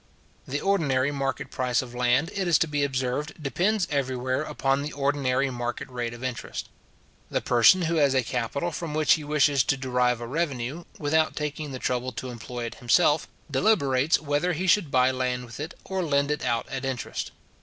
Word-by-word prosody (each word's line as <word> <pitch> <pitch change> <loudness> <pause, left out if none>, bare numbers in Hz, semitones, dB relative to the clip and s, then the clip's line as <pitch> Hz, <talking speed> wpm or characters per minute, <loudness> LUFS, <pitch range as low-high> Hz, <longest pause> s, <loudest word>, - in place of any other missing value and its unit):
The 145 +2 -2
ordinary 145 -9 +1
market 135 -1 -3
price 125 -1 0
of 120 -1 -10
land, 125 +7 +2
it 195 -2 -1
is 170 -3 +5
to 165 - +1
be 145 -1 0
observed, 130 +2 -1
depends 180 +7 0
everywhere 130 -2 -1
upon 135 +1 0
the 150 +1 -4
ordinary 140 -1 +1
market 120 -1 -4
rate 120 -2 -3
of 120 - -11
interest. 130 -2 -4 0.6
The - - 0
person 125 +10 +5
who 165 0 0
has 140 -3 +3
a 130 - +3
capital 140 +9 -2
from 155 -1 -5
which 155 -1 +5
he 155 - -1
wishes 145 -2 +3
to 135 - +1
derive 125 -2 +1
a 120 - -5
revenue, 140 +1 -2
without 155 +1 +1
taking 150 0 -4
the 130 - -4
trouble 125 0 -1
to 130 - -5
employ 120 +1 -6
it 115 - -6
himself, 150 +5 +3 0.2
deliberates 140 -2 +3
whether 150 +4 0
he 175 +4 -2
should 185 -3 +3
buy 130 -1 +4
land 125 -1 -2
with 120 +2 -11
it, 155 +4 -5
or 190 -1 -2
lend 140 -2 +1
it 150 - -2
out 120 -1 0
at 135 0 -4
interest. 130 -3 -3
135 Hz, 190 wpm, -26 LUFS, 125-150 Hz, 0.6 s, is